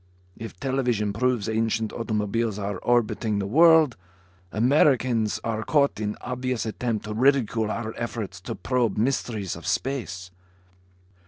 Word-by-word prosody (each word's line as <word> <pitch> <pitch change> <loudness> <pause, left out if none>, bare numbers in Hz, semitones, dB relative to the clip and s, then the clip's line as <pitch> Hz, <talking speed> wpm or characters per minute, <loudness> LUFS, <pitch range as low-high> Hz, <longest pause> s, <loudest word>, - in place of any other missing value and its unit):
If 115 0 -9
television 125 -6 0
proves 120 -1 0
ancient 110 0 0
automobiles 110 -1 -1
are 100 -2 -3
orbiting 115 -3 +1
the 100 - -1
world, 160 - +5 0.5
Americans 120 -2 +2
are 110 -1 -2
caught 140 0 +2
in 105 -1 -3
obvious 125 -1 -3
attempt 110 0 -2
to 105 - -4
ridicule 115 -3 +2
our 110 0 -3
efforts 115 -3 -5
to - - -5
probe 120 -5 0
mysteries 110 -5 -1
of 85 - -9
space." 95 -10 -2
115 Hz, 130 wpm, -25 LUFS, 105-125 Hz, 0.5 s, world